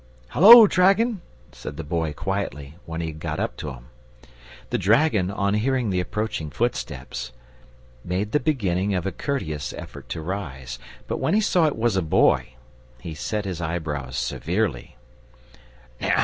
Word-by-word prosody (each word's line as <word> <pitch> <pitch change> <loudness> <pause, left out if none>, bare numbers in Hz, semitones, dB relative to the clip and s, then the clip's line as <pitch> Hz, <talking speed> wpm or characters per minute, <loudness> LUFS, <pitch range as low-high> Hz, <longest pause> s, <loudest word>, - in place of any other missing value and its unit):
"Hullo, 225 +6 +10
dragon!" 195 +3 +3 0.3
said 75 - -8
the 80 - -4
Boy, 80 0 -1
quietly, 80 -5 -4
when 80 0 -4
he 80 - -3
had 80 0 -9
got - - -4
up - - -2
to 75 - -5
him. - - -11 0.9
The - - +1
dragon, 105 - +3
on 100 0 0
hearing 120 0 +1
the 90 - +1
approaching 105 -3 -3
footsteps, 65 -1 -3 0.7
made 95 +4 -2
the 150 - +3
beginning 100 - 0
of 90 - -2
a 95 - -1
courteous 75 - -3
effort - - -10
to 85 - -4
rise. 70 -9 -5 0.3
But - - -2
when - - +1
he - - +5
saw 180 -6 +3
it 150 - -2
was 115 -2 +1
a - - +2
Boy, 80 -4 +2 0.4
he 80 +5 -7
set 105 +7 -3
his 90 -3 -4
eyebrows 80 -6 -3
severely. 85 - -2
95 Hz, 155 wpm, -24 LUFS, 80-115 Hz, 0.9 s, Hullo